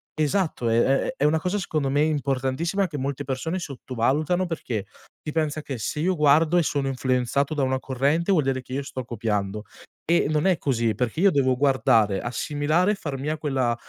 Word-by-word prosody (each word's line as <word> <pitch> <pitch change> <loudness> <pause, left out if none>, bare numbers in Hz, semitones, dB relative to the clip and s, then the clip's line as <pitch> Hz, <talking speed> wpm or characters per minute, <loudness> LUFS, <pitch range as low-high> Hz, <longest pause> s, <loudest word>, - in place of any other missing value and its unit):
esatto 155 -5 0
è 115 +1 +3
è 135 +1 +1
è - - -1
una 155 +2 +3
cosa, 180 +5 -1
secondo 155 -7 -1
me 145 +2 +2
importantissima, 150 +5 0
che 150 -4 -6
molte 135 +1 -3
persone 140 +7 -3
sottovalutano, 145 +3 -1
perché 125 - -4 0.4
si 150 - -4
pensa 155 -1 -1
che 135 -5 -5
se 150 - -3
io 185 +3 +1
guardo 155 +2 +4
e - - +5
sono 140 -2 -1
influenzato 130 +2 0
da 145 - 0
una 130 0 0
corrente, 140 +8 0
vuol 165 -6 +3
dire 135 -1 -1
che 130 - -10
io 140 +1 -2
sto 130 -1 -6
copiando, 105 -3 -2 0.4
e 170 -1 +3
non 155 +1 +1
è 185 -3 +3
così 115 -5 0
perché 125 - -2
io 200 0 +6
devo 130 -4 +2
guardare, 115 -7 +2
assimilare 150 - 0
e - - 0
far 145 -8 -5
mia 150 +4 -2
quella 130 -6 0
140 Hz, 195 wpm, -24 LUFS, 130-155 Hz, 0.4 s, io